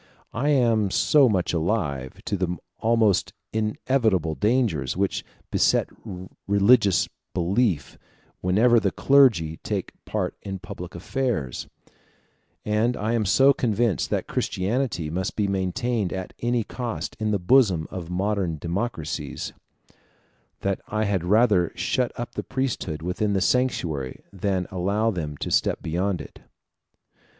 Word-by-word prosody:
I 135 +6 0
am 115 -7 +3
so 140 +6 +4
much 95 -5 0
alive 80 - -2
to 105 - -1
the 90 -2 -1 0.2
almost 110 -4 +2 0.2
inevitable 110 - +1
dangers 105 - +1
which 100 0 0 0.3
beset - - +2 0.6
religious 100 0 +4 0.3
belief 90 - 0 0.4
whenever 115 +6 +4
the 100 -2 +1
clergy 100 - +4
take - - -3
part - - -2
in 95 -1 -5
public 90 -1 -8
affairs, 95 - -2 1.0
and 110 +3 +1
I 110 +3 -1
am 115 -3 +1
so 135 +8 +5
convinced 115 - 0
that - - -1
Christianity 95 - -1
must 95 +3 -2
be 105 -2 +1
maintained 100 +2 -1
at 95 -1 -5
any 120 -1 +1
cost 120 +1 -5
in 110 0 0
the 105 - +2
bosom 95 -4 +3
of 85 -3 -6
modern 95 -2 -1
democracies, 85 0 -3 1.1
that 100 -1 -1
I 110 +1 -1
had 100 -4 0
rather 100 -2 +3
shut 125 -2 0
up 120 - -5
the - - -3
priesthood 125 - -3
within 100 +4 -1
the 95 - +2
sanctuary 85 - 0
than 95 -1 -1
allow 100 +5 +1
them 75 -6 -4
to - - -4
step - - +2
beyond 90 +3 -1
it. - - -12
100 Hz, 130 wpm, -25 LUFS, 90-115 Hz, 1.1 s, so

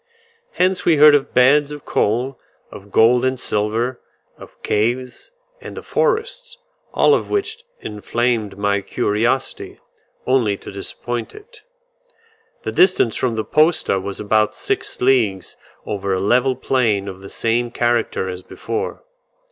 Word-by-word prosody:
Hence 185 0 +1
we 165 - +4
heard 150 0 +8
of 145 -2 +1
beds 140 +3 +4
of 145 -1 -9
coal, 125 +5 0 0.3
of 100 +1 -12
gold 120 +4 +4
and 130 -1 0
silver, 115 +3 -1 0.3
of - - -15
caves, 125 - -1 0.3
and - - -9
of - - -8
forests, 485 +1 -1 0.3
all 440 - +4
of - - 0
which 440 +3 -2 0.2
inflamed 110 0 -2
my 100 0 0
curiosity, 115 +7 -1 0.5
only 120 -6 +2
to - - -10
disappoint 115 +4 -5
it. 445 +4 -15 1.0
The - - -3
distance 360 - +3
from 120 -3 -1
the 110 - -2
posta 155 - +2
was 100 +1 -5
about 105 0 +1
six - - -3
leagues 115 -8 +1 0.3
over 100 -1 -3
a - - -1
level 125 +6 +2
plain 115 -6 0
of 95 -1 -8
the 100 - -10
same 120 +1 0
character 120 -5 0
as 90 0 -5
before. - - -5
120 Hz, 140 wpm, -19 LUFS, 105-135 Hz, 1.0 s, heard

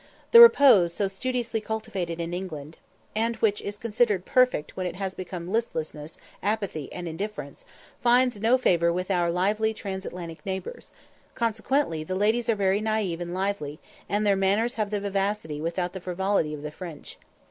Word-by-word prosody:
The 470 - +11
repose 250 - +7
so 200 - +1
studiously 230 +3 -2
cultivated 210 -6 -4
in 170 +1 -3
England, 160 -4 -6 0.4
and 230 +2 0
which 215 -2 +1
is 205 0 -5
considered 210 -4 +1
perfect 255 -12 +2
when 185 -1 -2
it 175 - -5
has 190 0 -3
become 180 -1 -6
listlessness, 160 -9 -3 0.2
apathy, 200 -9 -2
and 180 -1 -6
indifference, 165 -4 -6 0.4
finds 245 -3 +3
no 235 +4 +4
favour 170 -8 +3
with 180 +3 -2
our 175 -2 +2
lively 210 +5 +1
Transatlantic 180 -5 -6
neighbours; 195 - -6 0.4
consequently 230 - 0
the 185 +4 -4
ladies 220 +4 +1
are 230 - +4
very 195 0 +1
naïve 215 -6 -1
and 175 0 -5
lively, 190 -7 -2 0.3
and 205 +3 0
their 200 -1 +4
manners 200 +5 +1
have 215 -2 -2
the 210 0 -1
vivacity 195 -6 -2
without 175 +2 -2
the 190 - -7
frivolity 180 -3 0
of 145 - -10
the 150 - -5
French. 165 -2 -9
195 Hz, 165 wpm, -26 LUFS, 175-220 Hz, 0.4 s, The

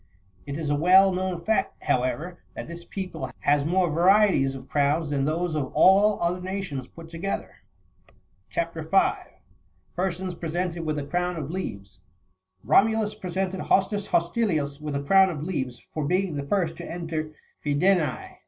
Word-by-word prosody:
It 140 0 -4
is 155 -3 -2
a - - +3
well 185 +5 +6
known 180 -2 -3
fact, 220 -2 0
however, 150 +8 -1 0.2
that - - -6
this 170 +1 -9
people 180 -8 -5
has 145 0 +3
more 175 +1 +2
varieties 175 -5 +4
of 135 - -10
crowns 145 +2 +1
than 140 -1 0
those 165 +3 -1
of 145 -4 -2
all 200 +2 +5
other 175 +1 0
nations 180 -9 -4
put 165 -1 -12
together. 170 +4 -5 0.9
CHAP. 170 0 -2
5. 195 - +2 0.7
PEESONS 185 0 -2
PEESENTED 170 +1 -3
WITH 155 -1 -2
A 145 - -2
CROWtf 180 +3 -1
OF 155 -1 -4
LEAVES. 100 - -6 0.6
Romulus 220 0 +3
presented 190 -2 -3
Hostus 200 +2 +1
Hostilius30 165 -6 0
with 150 -2 -4
a 140 - -2
crown 190 +5 +5
of 150 -5 -5
leaves, 130 -9 -4
for 155 - -2
being 180 +3 0
the 140 -1 -4
first 170 -2 0
to - - -7
enter 165 -2 -4 0.3
Fidense. 155 0 +1
170 Hz, 155 wpm, -25 LUFS, 145-190 Hz, 0.9 s, well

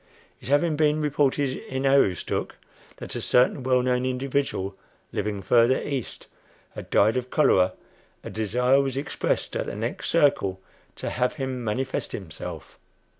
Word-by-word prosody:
It - - -12
having 145 +4 +2
been 150 0 +2
reported 145 -2 +1 0.2
in 130 +1 -2
Aroostook 135 -10 +1 0.4
that - - -7
a - - -3
certain 125 +3 +3
well 125 0 +2
known 125 0 +1
individual, 130 -6 -1 0.4
living 100 -1 -3
further 120 +2 +4
east, 135 -5 -5 0.5
had - - -9
died 110 +5 +3
of 125 0 -3
cholera, 95 - +3 0.5
a - - -7
desire 125 +6 +2
was 135 -1 -2
expressed 140 - -2
at - - -2
the - - -5
next 115 +4 -3
"circle" 140 - +2 0.4
to - - -5
have 125 0 0
him 130 -2 -4
"manifest" 130 +5 -2
himself. 85 -2 -8
130 Hz, 145 wpm, -25 LUFS, 110-140 Hz, 0.5 s, further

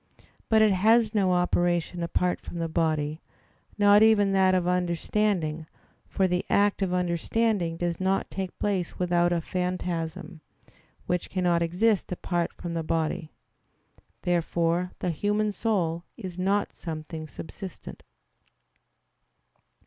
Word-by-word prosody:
But 220 -1 +5
it 215 - +5
has 220 +4 +4
no 195 -4 +2
operation 175 -1 +1
apart 180 +1 0
from - - -8
the 165 -1 -1
body, 155 -1 -1 0.6
not 205 0 +6
even 215 -3 +5
that 190 -1 +4
of 180 -1 +1
understanding: 175 -2 0 0.4
for 190 - +1
the 180 0 0
act 205 0 +2
of 190 -2 0
understanding 180 +1 0
does 175 0 -2
not 190 +1 0
take 190 -2 -5
place 190 -4 -2
without 175 -1 +2
a 170 -1 +1
phantasm, 180 -1 -3 0.6
which 180 -1 -2
cannot 175 -2 +1
exist 185 +6 +1
apart 175 -1 -1
from 170 -1 -6
the 165 - -1
body. 160 +1 -2 0.9
Therefore 170 0 0
the 180 - -1
human 210 +5 0
soul 175 -6 -1
is 185 -3 -7
not 195 +3 0
something 155 -1 -6
subsistent. 185 +4 -9
180 Hz, 125 wpm, -27 LUFS, 170-195 Hz, 0.9 s, not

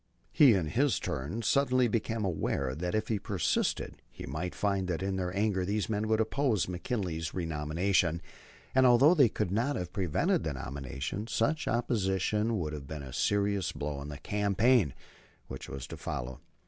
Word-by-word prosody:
He 135 -7 +6
in 90 -4 0
his 135 - +2
turn 80 - -3
suddenly 130 0 +3
became 115 -1 -1
aware 70 -7 -1
that 90 +7 -3
if 110 - 0
he 110 -3 0
persisted 95 -4 -1
he - - -9
might 80 +7 -4
find 100 -2 0
that 90 0 -2
in 95 0 -1
their 90 -1 -2
anger 100 -3 +1
these 105 +3 -1
men 105 0 -1
would 110 0 +2
oppose 110 -1 +1
Mr. - - -9
McKinley's 90 -4 -3
renomination, 85 +1 0 0.5
and 130 0 +5
although 130 +7 +6
they 140 -9 +5
could 100 -3 -2
not 120 +8 +1
have 90 -1 -4
prevented 90 -6 +1
the - - -2
nomination, 70 - -5
such 145 +7 0
opposition 110 -1 0
would 80 -5 -3
have 70 -3 -7
been 75 -1 -6
a 65 -2 -9
serious 100 -3 +1
blow 70 -1 -4
in 70 - -7
the 70 - -6
campaign 100 - +2 0.5
which 65 - -7
was 65 -2 -6
to - - -8
follow. 60 +1 -5
95 Hz, 175 wpm, -30 LUFS, 80-110 Hz, 0.5 s, He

